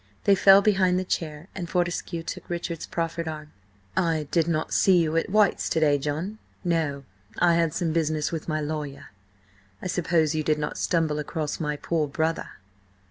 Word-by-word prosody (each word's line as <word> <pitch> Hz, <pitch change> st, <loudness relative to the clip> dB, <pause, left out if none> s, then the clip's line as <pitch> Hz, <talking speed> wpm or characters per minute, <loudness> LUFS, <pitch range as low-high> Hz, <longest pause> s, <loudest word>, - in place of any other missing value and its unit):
They 200 Hz, -, +5 dB
fell 195 Hz, +1 st, +7 dB
behind 190 Hz, -3 st, +3 dB
the 185 Hz, -, 0 dB
chair, 160 Hz, -2 st, -3 dB
and 175 Hz, -3 st, -5 dB
Fortescue 175 Hz, -1 st, -1 dB
took -, -, -7 dB
Richard's 170 Hz, -1 st, -4 dB
proffered 165 Hz, 0 st, -3 dB
arm. 155 Hz, -1 st, -6 dB, 0.4 s
"I 160 Hz, -4 st, +1 dB
did 165 Hz, -2 st, +2 dB
not 155 Hz, -2 st, -1 dB
see 190 Hz, -2 st, +5 dB
you 160 Hz, -2 st, +1 dB
at 165 Hz, -, +1 dB
White's 210 Hz, -1 st, +3 dB
to 160 Hz, -, +1 dB
day, 145 Hz, -2 st, +3 dB
John?" 155 Hz, +10 st, -3 dB, 0.2 s
"No. 160 Hz, -6 st, 0 dB, 0.3 s
I 175 Hz, -1 st, +4 dB
had 165 Hz, -1 st, +2 dB
some 170 Hz, -3 st, 0 dB
business 155 Hz, -2 st, 0 dB
with 160 Hz, -2 st, -4 dB
my 155 Hz, 0 st, 0 dB
lawyer. 150 Hz, -2 st, -5 dB, 0.7 s
I -, -, -10 dB
suppose 170 Hz, -3 st, +1 dB
you 155 Hz, -, 0 dB
did 155 Hz, 0 st, +1 dB
not 150 Hz, 0 st, -3 dB
stumble 160 Hz, -3 st, +1 dB
across 150 Hz, 0 st, -3 dB
my 150 Hz, -2 st, -1 dB
poor 155 Hz, 0 st, -1 dB
brother?" 160 Hz, +3 st, -1 dB
165 Hz, 180 wpm, -26 LUFS, 155-175 Hz, 0.7 s, fell